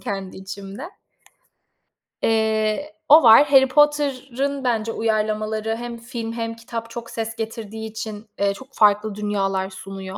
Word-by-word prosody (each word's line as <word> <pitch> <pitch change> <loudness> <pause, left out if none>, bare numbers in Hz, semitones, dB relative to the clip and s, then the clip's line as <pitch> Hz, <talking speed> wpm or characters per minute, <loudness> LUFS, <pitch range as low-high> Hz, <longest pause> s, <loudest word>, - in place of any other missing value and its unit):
kendi 195 -2 -5
içimde. 195 +3 -8 1.4
Eee 220 +5 +1 0.2
o 305 0 +9
var. 230 +5 +8
Harry 265 -1 +7
Potter'ın 280 -1 +1
bence 225 -3 0
uyarlamaları 215 0 -1
hem 240 0 -6
film 230 -1 -6
hem 230 -1 -3
kitap 230 0 -7
çok 235 0 -8
ses 225 0 -4
getirdiği 220 -1 -6
için, 220 0 -7
eee, 200 0 +2
çok 260 +6 -12
farklı 210 0 +3
dünyalar 195 -2 -1
sunuyor 190 0 -8
225 Hz, 130 wpm, -22 LUFS, 210-235 Hz, 1.4 s, o